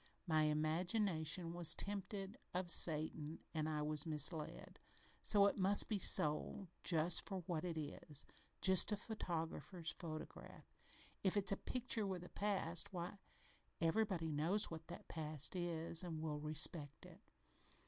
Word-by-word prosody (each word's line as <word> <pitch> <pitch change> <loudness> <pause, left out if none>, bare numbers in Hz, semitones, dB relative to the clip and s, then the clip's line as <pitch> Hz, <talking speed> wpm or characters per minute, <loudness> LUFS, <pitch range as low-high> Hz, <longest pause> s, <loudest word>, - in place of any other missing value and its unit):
My 155 -3 +2
imagination 165 +2 0
was 170 -2 +7
tempted 200 0 -4 0.2
of 180 -1 -1
Satan 155 -1 +2 0.2
an' 155 -1 -1
I 150 -1 -2
was 150 +1 0
misled. 155 +1 +2 0.4
So 205 -2 +5
it 200 - +1
must 195 +2 +2
be 210 -3 0
sold 155 +3 +3
for - - -39
just 165 +3 0
what 175 -4 -3
it 170 -3 -4
is 150 -1 -6 0.4
just 190 +2 +7
a 210 - 0
photographer's 175 -4 -4
photograph. 155 -2 -8 0.6
If 195 +1 +1
it's 200 -1 +3
a - - +2
picture 235 -2 -2
with 185 -2 -4
a 180 - -11
past, 195 -4 -1
why, 180 +2 -6 0.6
everybody 165 -1 0
knows 170 +9 +1
what 160 -1 -8
that 170 - -10
past 155 0 -4
is, 170 -1 -1
and 170 -4 -5
will 155 -2 -3
respect 150 -1 +1
it. - - -14
170 Hz, 140 wpm, -40 LUFS, 155-190 Hz, 0.6 s, was